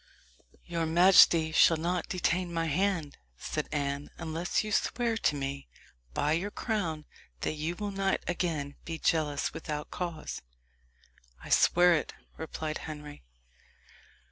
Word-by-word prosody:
"Your 170 -2 -2
majesty 165 -1 +6
shall 160 +1 +5
not 175 +2 -2
detain 180 0 0
my 165 -1 -1
hand," 165 -1 -1 0.2
said - - -4
Anne, 140 -1 -2
"unless 165 +5 -1
you 215 - -5
swear 230 +2 +1
to 150 - +1
me, 140 0 -4 0.5
by 150 - +1
your 170 +6 0
crown, 175 -9 -2 0.4
that - - 0
you 155 +3 -3
will 205 +2 -4
not 195 0 0
again 160 -5 -2
be 165 -1 -5
jealous 150 -3 0
without 150 -1 -5
cause." 170 -3 -5 1.0
"I - - -9
swear 175 0 +5
it," 155 - -1 0.2
replied 160 -1 -4
Henry. 150 -1 -8
165 Hz, 130 wpm, -30 LUFS, 150-180 Hz, 1.0 s, majesty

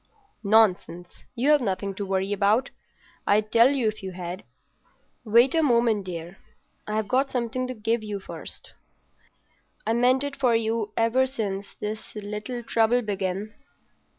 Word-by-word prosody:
"Nonsense. 200 -4 +1
You've 285 +4 +3
nothing 195 -2 -2
to 200 +1 -5
worry 190 +1 0
about; 210 +6 +2 0.6
I'd 210 +1 +2
tell 235 +2 +6
you 270 -5 +1
if 215 0 -3
you 190 -1 -6
had. 180 +1 -6 0.8
Wait 235 +4 +4
a 325 - +3
moment, 235 -7 +2
dear. 170 +1 -7 0.5
I've 215 0 -1
got 265 +4 +1
something 250 +1 -2
to 255 - -5
give 225 +1 0
you 205 -2 -4
first. 190 - -9 1.1
I 225 - +1
meant 250 +3 +3
it 285 0 -4
for 250 -4 +2
you 225 -1 -1
ever 230 +3 +3
since 200 -6 -4
this 215 +1 -6
little 210 +4 -5
trouble 230 +2 +2
began. 200 0 -3
220 Hz, 145 wpm, -25 LUFS, 200-245 Hz, 1.1 s, tell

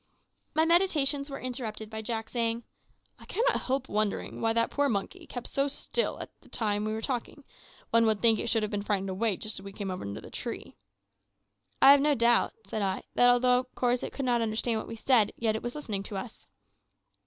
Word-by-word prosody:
My 315 +1 +4
meditations 305 -5 +2
were 275 - -6
interrupted 240 -4 -5
by 220 0 -4
Jack 225 0 -3
saying 230 -1 -1 0.6
"I - - -13
cannot - - +1
help 265 0 -1
wondering 210 -1 -2
why 225 - +2
that 230 0 +1
poor 285 0 +2
monkey 310 - -3
kept 245 - -6
so 275 +1 +1
still 380 - -1
all - - -5 0.2
the - - -20
time 210 -2 -1
we 215 - -1
were 220 +1 -4
talking. 260 +2 -3 0.5
One 230 0 +5
would 215 -2 +2
think 225 -1 +4
that - - -2
it - - -4
should 225 -2 +2
have 210 - -2
been 205 -1 -1
frightened 195 -2 -1
away 200 0 0
just 215 -2 -4
as - - -12
we 200 - -8
came 195 -1 -5
under 100 - -5
the - - -12
tree." - - -5 1.1
"I 270 - +10
have 280 0 +7
no 295 0 +3
doubt," 235 0 +3
said 210 +2 -3
I, 190 -1 -1
"that 245 - +5
although 250 0 +4
of 255 0 -9
course 245 0 +1
it - - -4
could 275 - -4
not 240 -2 +2
understand 225 +1 0
what - - -7
we - - -6
said, 225 -2 +3
yet 220 -2 0
it 220 - -3
was 240 +2 -5
listening 220 -10 -3
to 200 0 -5
us." 215 +4 -8
230 Hz, 220 wpm, -29 LUFS, 215-260 Hz, 1.1 s, I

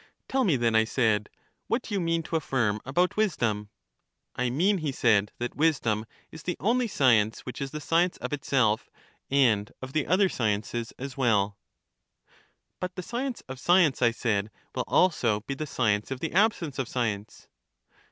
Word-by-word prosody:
Tell 265 0 +1
me, 180 - +3
then, 120 -2 +1
I 110 0 +5
said, 110 -3 +1 0.4
what 240 0 -2
you 200 - 0
mean 165 -1 0
to 165 - -4
affirm 120 -9 0
about 175 +7 +1
wisdom. 115 - 0 0.7
I 125 -1 0
mean, 180 +10 +2
he 155 -3 -2
said, 105 -5 +2
that 120 0 -3
wisdom 120 -9 +1 0.2
is 160 - -10
the 180 - -3
only 240 +4 +1
science 115 - +3
which 125 - -8
is 135 - -2
the 150 - -6
science 170 +4 +1
of - - -5
itself 130 -6 +1 0.4
and 115 -7 +3
of 130 +1 -8
the 155 -3 0
other 190 +3 +4
sciences 115 - -2
as 135 +1 -7
well. 105 -6 +2 1.2
But 185 0 -4
the 185 - -5
science 245 +4 -3
of 130 0 -7
science, 175 -4 +3
I 120 - +5
said, 110 -3 -1 0.2
will - - -2
also 120 - +2
be 140 - -5
the/ 150 +3 -5
science 105 -6 0
of 135 -1 -4
the 160 - -4
absence 180 - +1
of 130 - -1
science. 110 -4 -3
135 Hz, 170 wpm, -27 LUFS, 110-165 Hz, 1.2 s, I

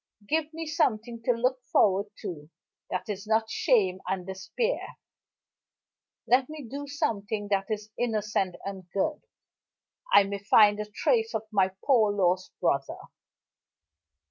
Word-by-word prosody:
Give 315 +2 0
me 325 0 -5
something 235 -6 0
to 250 - +4
look 250 +2 0
forward 200 +1 +3 0.2
to 160 -7 -6 0.4
that 185 - -3
is 205 -1 -5
not 220 +1 +1
shame 195 - +2
and 185 -2 -2
despair. 325 - -3 1.3
Let 255 +2 +3
me 310 -1 -7
do 285 +4 -6
something 220 -8 -2
that 195 0 0
is 215 0 -4
innocent 210 -5 0
and 190 -2 -7
good 245 - -1 0.9
I 200 - +8
may 200 0 -4
find 205 +1 +5
a 210 0 -4
trace 450 - +1
of 215 - -1
my 195 -3 +3 0.2
poor 230 -7 +4
lost 185 -2 +1
brother. 140 -6 0
210 Hz, 135 wpm, -28 LUFS, 195-255 Hz, 1.3 s, I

